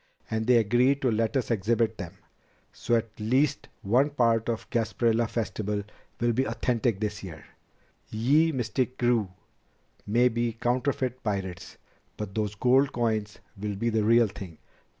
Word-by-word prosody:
And 110 0 -1
they 125 -1 +6
agreed 120 +5 +3
to 125 - +3
let 115 +4 0
us 125 - -2
exhibit 115 +1 0
them. 90 -4 -7 0.6
So 120 - 0
at 115 -1 -1
least 130 +7 +1 0.2
one 125 +9 +3
part 115 -5 +1
of 115 -2 -1
the 120 - +2
Gasparilla 115 0 +1
Festival 105 -2 -2 0.4
will 120 0 +2
be 130 +4 +1
authentic 115 -1 0
this 105 -1 -3
year. 80 -5 -9 0.6
Ye 145 +9 +3
Mystic 125 -1 -2
Krewe 120 -5 +1 0.8
may 120 +4 +4
be 120 -1 -1
counterfeit 130 +2 -1
pirates, 95 -4 -4 0.4
but 105 -2 -5
those 105 -1 -2
gold 130 +5 +3
coins 110 -3 -1 0.2
will 105 0 -4
be 115 +4 -1
the 110 -1 +1
real 115 +2 +5
thing. 95 -5 -8
115 Hz, 150 wpm, -27 LUFS, 105-125 Hz, 0.8 s, they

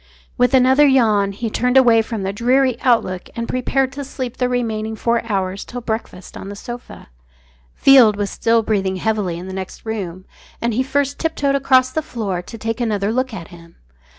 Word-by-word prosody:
With 250 +2 +3
another 260 +3 +5
yawn 215 -7 +3
he 220 +3 -4
turned 250 +3 +1
away 235 -3 +6
from 220 -2 -5
the 195 +1 -2
dreary 255 +3 +2
outlook 185 -7 +1
and 230 0 -3
prepared 260 +1 0
to 280 +2 -6
sleep 255 -2 -6
the 250 -1 0
remaining 220 -3 -2
four 235 +2 0
hours 190 0 -2
till 245 - -7
breakfast 220 -5 -5
on 195 - -8
the 205 - -7
sofa. 240 - -9 0.7
Field 255 -6 +6
was 205 -1 -3
still 230 0 +2
breathing 195 -3 0
heavily 200 -3 -1
in 175 - -8
the 190 - -7
next 190 +2 -7
room, 190 -5 -5 0.3
and 235 0 -1
he 245 - +1
first 280 +1 -1
tip 325 0 -1
toed 280 -1 +1
across 260 -2 +3
the 315 - -1
floor 205 - -4
to 230 +6 -10
take 225 +2 -3
another 210 -3 0
look 255 +2 -1
at 180 -7 -8
him. 170 -1 -15
230 Hz, 195 wpm, -19 LUFS, 200-255 Hz, 0.7 s, away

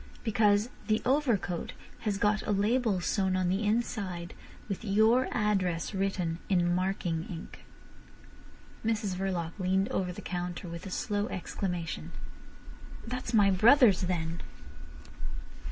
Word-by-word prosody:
Because 210 0 +3 0.2
the 215 -1 +3
overcoat 245 - +1 0.3
has 210 -3 -1
got 210 +1 +2
a - - +1
label 210 -1 +2
sewn 190 +1 +1
on 185 -1 +1
the 190 +4 0
inside 205 -6 -1 0.3
with 200 +1 -4
your 220 +5 +4
address 195 -6 0
written 190 -4 -1
in 175 -2 +3
marking 180 -3 -1
ink." 170 -2 -8 1.2
Mrs 220 -3 0
Verloc 180 -3 -2
leaned 190 +1 +1
over 180 -1 -1
the 180 - -9
counter 180 -1 -4
with 170 +2 -7
a 190 +2 -3
low 205 +1 +1
exclamation. 180 -5 -4 0.9
"That's 250 0 -4
my 205 -4 +5
brother's, 225 +1 +6
then." 170 -2 -2
195 Hz, 120 wpm, -30 LUFS, 180-215 Hz, 1.2 s, brother's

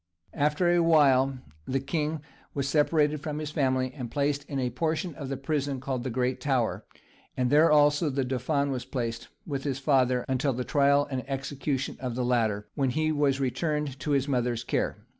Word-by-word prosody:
After 150 +4 +1
a 175 0 +4
while 135 -5 +4 0.3
the 135 +1 0
king 150 +2 -2 0.3
was 140 -1 -1
separated 150 0 +2
from 150 0 -4
his 155 -1 -4
family, 130 -4 0
and 125 -5 -5
placed 145 +2 0
in 140 - -5
a 125 -2 -1
portion 160 - -1
of 140 -2 -7
the 135 - -3
prison 140 -1 -2
called 130 -2 -3
the 130 - -2
Great 125 +1 -1
Tower, 130 -5 0 0.5
and 125 0 +1
there 155 +3 +6
also 145 +1 +4
the 135 -1 -1
dauphin 140 +3 0
was 130 -2 -3
placed, 115 -3 -4 0.2
with 140 -4 -4
his 140 -3 -2
father, 130 -3 +2
until 130 +1 0
the 125 +1 -3
trial 140 +1 +3
and 130 -1 -2
execution 135 0 -3
of 125 -3 -4
the 125 0 -1
latter, 110 -4 0
when 135 -2 0
he 155 +5 0
was 145 -2 +1
returned 150 +1 -1
to 150 - -5
his 140 -1 +2
mother's 120 -3 0
care. - - -2
140 Hz, 190 wpm, -27 LUFS, 130-150 Hz, 0.5 s, there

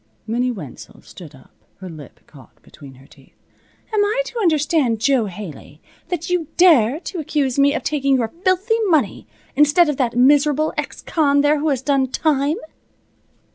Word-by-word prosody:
Minnie 245 +3 -1
Wenzel 175 - -9
stood 155 -6 -13
up, 130 - -20 0.2
her 190 - -10
lip 155 -6 -12
caught - - -19
between 135 -2 -15
her 135 +1 -18
teeth. - - -22 0.6
"Am 420 -1 +3
I 440 +5 0
to 485 - -6
understand, 300 - +1
Jo 245 -2 +1
Haley, 175 -6 -10 0.3
that 345 -1 -4
you 355 -4 -1
dare 300 -7 +4
to 370 - -6
accuse 280 -3 -1
me 280 +1 +3
of - - -3
taking 275 -2 0
your 230 -3 -1
filthy 400 +4 +1
money, 320 -7 0 0.3
instead 300 +4 +4
of 295 - -2
that 245 -3 -1
miserable 290 +3 +3
ex - - -5
con 285 -3 +1
there 295 +1 +2
who 310 +2 0
has 265 -3 -1
done 275 -2 +1
time?" 290 +2 0
280 Hz, 170 wpm, -19 LUFS, 235-315 Hz, 0.6 s, dare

